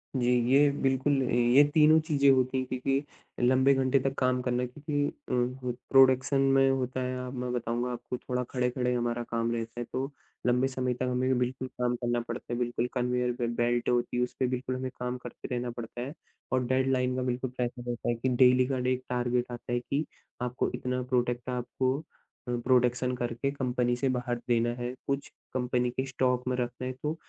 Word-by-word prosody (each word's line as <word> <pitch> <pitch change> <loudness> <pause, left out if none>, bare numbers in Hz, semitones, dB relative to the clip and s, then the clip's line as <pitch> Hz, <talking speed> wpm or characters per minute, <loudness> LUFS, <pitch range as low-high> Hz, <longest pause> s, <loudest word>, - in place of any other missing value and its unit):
जी, 125 -2 +2 0.2
ये 145 +2 +6
बिल्कुल 135 +1 +2
ये 120 +3 +5
तीनों 155 0 +6
चीज़ें 145 -3 +3
होती 130 0 +2
हैं 130 - 0
क्योंकि 135 +2 0 0.4
लंबे 130 +2 +5
घंटे 135 0 +2
तक 135 +1 -1
काम 130 -1 +2
करना। 125 0 0
क्योंकि 145 +3 -2
अ, 125 0 -2 0.2
प्रोडक्शन 135 +1 +5
में 135 0 +4
होता 130 -1 -1
है 130 0 -2
अब 125 - -6
मैं 125 0 -2
बताऊँगा 120 +1 -1
आपको 125 +1 -5
थोड़ा 125 0 -2
खड़े-खड़े 125 0 0
हमारा 120 0 -1
काम 115 0 0
रहता 115 0 -4
है 120 - -3
तो 135 +2 -2 0.4
लंबे 125 +2 +3
समय 130 -1 -1
तक 125 - -4
हमें 130 +1 +1
बिल्कुल 130 +1 -2
काम 125 -1 -1
करना 120 0 -1
पड़ता 120 - -6
है। - - -1
बिल्कुल 120 0 -1
कन्वेयर 125 -1 0
पे 120 -1 -1
बेल्ट 120 0 +1
होती 120 0 +1
है 125 - +3
उसपे 125 +1 -1
बिल्कुल 130 +1 -2
हमें 130 0 -4
काम 125 0 -2
करते 125 -1 -9
रहना 120 0 -2
पड़ता 120 0 -7
है। 135 +4 -5 0.4
और 130 -1 +2
डेडलाइन 130 0 +1
का 130 - -1
बिल्कुल 125 +1 -2
प्रेशर 120 0 -3
होता 120 -1 -2
है 120 - +2
कि 120 +3 -1
डेली 125 0 +5
का 130 -1 -1
डे 125 0 +1
एक 130 0 -4
टारगेट 125 0 0
आता 120 0 -7
है 120 - +2
कि 140 +5 -2 0.4
आपको 125 0 -1
इतना 125 0 -2
प्रोडक्ट 125 -1 -1
आपको 130 +1 -1 0.5
अ, - - -2
प्रोडक्शन 125 0 +2
करके 120 +2 -2
कंपनी 125 -3 0
से 135 +3 -1
बाहर 125 0 -1
देना 120 0 +3
है। 120 +1 -3
कुछ 140 0 -1 0.3
कंपनी 125 -1 0
के 130 +2 -2
स्टॉक 125 -1 0
में 125 - +1
रखना 125 0 -3
है। - - -2
तो 150 +1 -1
125 Hz, 200 wpm, -29 LUFS, 120-130 Hz, 0.5 s, ये